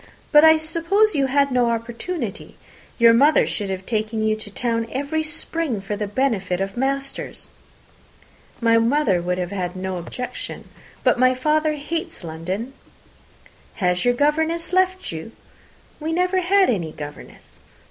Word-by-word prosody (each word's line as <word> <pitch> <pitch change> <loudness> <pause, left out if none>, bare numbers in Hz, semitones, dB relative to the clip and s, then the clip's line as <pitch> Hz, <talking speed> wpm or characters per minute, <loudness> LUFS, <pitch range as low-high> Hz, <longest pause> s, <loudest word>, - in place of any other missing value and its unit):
But 295 0 +7
I 320 0 +8
suppose 335 +7 +2
you 275 -2 +1
had 280 +1 +2
no 245 -2 +2
opportunity. 235 - -4 0.4
Your 230 -1 +7
mother 285 +6 +5
should 205 -3 -3
have 190 0 -4
taken 220 -1 -1
you 215 0 +2
to 215 -1 -8
town 230 +2 -1
every 285 +4 -1
spring 315 -5 -2
for 195 +2 -4
the 210 0 -3
benefit 205 -6 0
of 195 0 -3
masters." 275 +2 -3 1.1
"My 230 -1 +4
mother 230 -6 +2
would 180 +1 -1
have 180 0 -3
no 185 0 -3
objection, 245 +9 -6 0.4
but - - +3
my 255 0 +4
father 305 +3 +1
hates 300 - -5
London." 180 +10 -5 1.0
"Has 180 -3 0
your 245 0 +3
governess 320 +5 0
left 370 0 +1
you?" 165 +8 -7 0.7
"We 320 +1 -2
never 365 +2 +2
had 385 +2 +4
any 170 -8 -2
governess." 145 -1 -10
245 Hz, 145 wpm, -22 LUFS, 200-310 Hz, 1.1 s, I